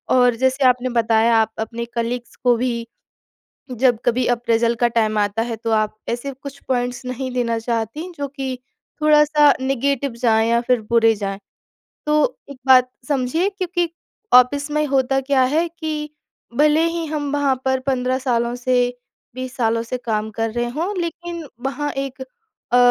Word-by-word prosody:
और 245 -2 +4
जैसे 260 +3 +1
आपने 250 0 +2
बताया 225 +1 +3
आप 220 0 +2
अपने 230 +1 -4
कलीग्स 240 +1 -3
को 245 -1 +4
भी 235 -1 -2 0.8
जब 245 -2 +2
कभी 245 +1 +2
अप्रेज़ल 235 -1 +1
का 240 +1 +2
टाइम 215 -1 +2
आता 205 +2 0
है 230 0 -2
तो 225 +1 -4
आप 215 -1 +1
ऐसे 240 +4 -3
कुछ 275 +1 -10
पॉइंट्स 245 -1 -1
नहीं 255 +1 -4
देना 235 -2 0
चाहतीं 235 - -3
जो 285 0 -2
कि 265 -2 -5 0.4
थोड़ा-सा 300 -1 +5
नेगेटिव 275 0 0
जाएँ 225 -2 +3
या 235 - +3
फिर 245 -1 +1
बुरे 230 -1 +4
जाएँ। 195 -1 -4 0.7
तो 300 - +2 0.4
एक 280 - -8
बात 255 -1 +6 0.2
समझिए 285 +6 +1
क्योंकि 360 -3 -1 0.5
ऑफ़िस 280 +4 +5
में 300 0 +1
होता 270 -1 +1
क्या 270 0 +2
है 330 +2 +2
कि 310 -2 -5 0.5
भले 300 +2 +4
ही 335 0 -3
हम 295 -2 -3
वहाँ 285 -2 +2
पर 265 0 +1
15 255 -1 0
सालों 240 -2 0
से 250 +1 -1 0.6
20 255 0 -6
सालों 230 -1 +1
से 235 +2 -4
काम 220 -1 -1
कर 225 0 0
रहे 240 +1 -1
हों 365 +6 -2
लेकिन 340 0 -5 0.2
वहाँ 290 +2 -2
एक 270 -1 -4 0.5
अ, - - +5
255 Hz, 165 wpm, -20 LUFS, 235-285 Hz, 0.8 s, बात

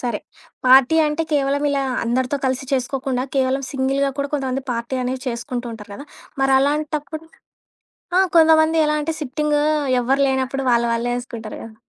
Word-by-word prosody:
సరే, 240 -4 -2 0.5
పార్టీ 265 +4 +6
అంటే 300 +2 -1
కేవలం 285 0 +1
ఇలా 280 -1 0 0.2
అందరితో 255 +4 0
కలిసి 260 0 -1
చేసుకోకుండా, 260 0 -1
కేవలం 265 +1 +1
సింగిల్‌గా 275 +1 0
కూడా 280 0 -1
కొంతమంది 270 -1 -2
పార్టీ 235 +2 -4
అనేవి 255 +1 -3
చేసుకుంటూ 245 +1 -4
ఉంటారు 210 -2 -11
కదా! 280 - -9 0.4
మరలాంటప్పుడు 295 +3 0 0.9
ఆ! - - +6 0.2
కొంతమంది 320 0 +5
ఎలా 300 0 +1
అంటే, 320 +2 -2
సిట్టింగు 295 +1 0 0.4
ఎవరు 265 +3 +1
లేనప్పుడు 265 0 -1
వాళ్ళ 235 0 +3
వాళ్ళే 235 +1 -1
ఏసుకుంటారు 230 -3 -8
కదా! 225 -1 -11
270 Hz, 145 wpm, -20 LUFS, 250-290 Hz, 0.9 s, పార్టీ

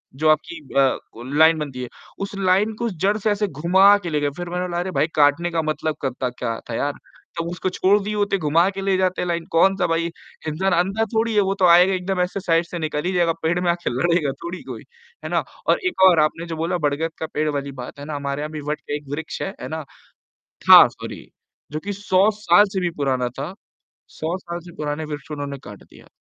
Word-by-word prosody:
जो 155 +2 +2
आपकी 240 - +1 0.2
अ, 135 -1 +4 0.2
को 115 - -10
लाइन 160 0 +6
बनती 130 -4 -5
है, 125 - -6 0.3
उस 195 0 -4
लाइन 195 +3 +2
को 235 +1 -2
जड़ 195 +3 0
से 215 0 0
ऐसे 205 0 0
घुमा 190 +6 +5
के 170 - -3
ले 150 -1 0
गए, 145 - +1
फिर 175 -1 -5
मैंने 180 +1 -2
कहा 175 0 -2
"अरे 185 +1 -3
भाई! 160 - +1
काटने 150 +4 +3
का 165 -1 0
मतलब 155 0 -2
करता 130 -1 -2
क्या 120 -2 -4
था 115 - -3
यार।" 145 +3 -1 0.5
तब 165 - -2
उसको 180 +1 -2
छोड़ 200 +3 +4
दिए 210 +1 -3
होते, 200 -1 +1
घुमा 165 +3 +3
के 195 0 -6
ले 195 -1 +1
जाते 185 -1 0
लाइन 170 -1 -2
को, 165 - 0
कौन 195 0 +5
सा 180 - +1
भाई 165 0 0 0.4
इंसान 190 +5 0
अंधा 195 +6 +1
थोड़ी 225 0 +1
है, 205 - +5
वो 195 0 +1
तो 185 - +5
आएगा 180 +3 +6
एकदम 185 0 -2
ऐसे 180 +2 -1
साइड 165 -2 +1
से 170 0 -6
निकल 155 -1 -2
ही 185 - 0
जाएगा 170 -2 +2
पेड़ 170 +2 +1
में 175 -1 +2
आके 175 0 -2
लड़ेगा 150 +3 +1
थोड़ी 175 +2 -5
कोई। - - -8 0.4
है - - -3
ना - - +1 0.2
और - - +3
एक 280 - -3
और 170 -3 +4
आपने 165 +2 -2
जो 165 - -4
बोला 170 +3 -1
बड़गत 160 +3 -2
का 160 - -2
पेड़ 155 0 0
वाली 140 -1 -3
बात 135 - -9
है 145 - -7
ना, 150 -1 -5
हमारे 140 0 -3
यहाँ 155 +1 -4
भी 155 -1 -6
वट 150 - -1
के 145 - -4
एक 145 -2 -14
वृक्ष 160 +1 -6
है, - - -2
है - - -5
ना, 160 -1 -5 0.9
था - - +11
सॉरी - - -9 0.5
जो 155 - -3
कि 205 - -2
100 195 +2 +4
साल 205 +1 +6
से 190 - 0
भी 175 - +1
पुराना 130 -3 0
था। 155 +7 -4 0.6
100 165 +4 -3
साल 175 -1 -6
से - - -14
पुराने 150 +1 -3
वृक्ष 145 +1 -7
उन्होंने 145 -2 -4
काट 105 -1 -11
दिया। - - -18
170 Hz, 245 wpm, -22 LUFS, 150-185 Hz, 0.9 s, था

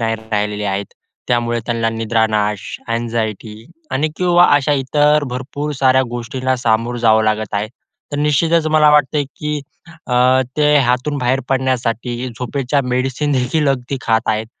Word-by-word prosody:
नाही 115 -1 0 0.2
राहिलेले 105 0 -1
आहेत. 100 0 -1 0.4
त्यामुळे 120 -1 +1
त्यांना 115 -1 0
निद्रानाश, 110 -2 0 0.3
अँग्झायटी 115 -1 -3 0.3
आणि 155 +4 +1
किंवा 175 -1 +4
अशा 145 +1 +2
इतर 145 +2 +2
भरपूर 140 +4 -4
साऱ्या 130 0 +4
गोष्टींना 130 +2 -2
सामोरं 120 0 0
जावं 110 -1 +3
लागत 110 -1 -1
आहे. 105 +1 -1 0.4
तर - - -2
निश्चितच 155 +2 +2
मला 155 -1 +4
वाटतं 150 0 +3
की 150 -1 -3 0.5
अ, 125 +1 +3 0.2
ते 150 0 +3
हातून 130 +2 +1
बाहेर 130 +1 +1
पडण्यासाठी 125 -2 -1
झोपेच्या 125 +4 -2
मेडिसिन 130 +3 -1
देखील 140 +3 +1
अगदी 135 0 -1
खात 115 -3 +2
आहेत. 110 +1 0
125 Hz, 140 wpm, -17 LUFS, 115-145 Hz, 0.5 s, किंवा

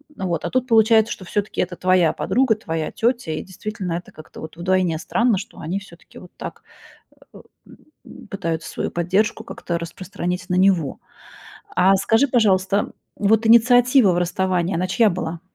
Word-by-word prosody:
Вот, 175 -3 -3
а - - -2
тут 255 0 -1
получается, 225 0 +4
что 190 - -7
всё-таки 205 +3 -3
это 180 0 -1
твоя 180 -3 +2
подруга, 250 -3 +1
твоя 165 -7 -4
тётя, 235 -7 -1
и 155 - -4
действительно, 190 -1 -6
это 175 +1 -6
как-то 155 - -13
вот 155 +1 -9
вдвойне 180 -1 0
странно, 230 +3 +1
что 220 +5 -9
они 175 +5 -3
всё-таки 175 -4 -16
вот 180 - -14
так, - - -8 0.7
э, - - -14 0.3
м, 305 - -17
пытаются 165 -5 -4
свою - - -3
поддержку 195 +6 0
как-то 170 -6 -4
распространить 180 +1 -5
на 180 - +1
него. 185 -7 +2 0.8
А 195 +1 +4
скажи, 225 +8 +2
пожалуйста, 200 -5 +1 0.2
вот 220 +2 +2
инициатива 245 -1 +5
в 175 - 0
расставании, 180 0 0
она 180 +2 -1
чья 210 +3 +3
была? 170 -1 -4
190 Hz, 160 wpm, -21 LUFS, 175-220 Hz, 0.8 s, инициатива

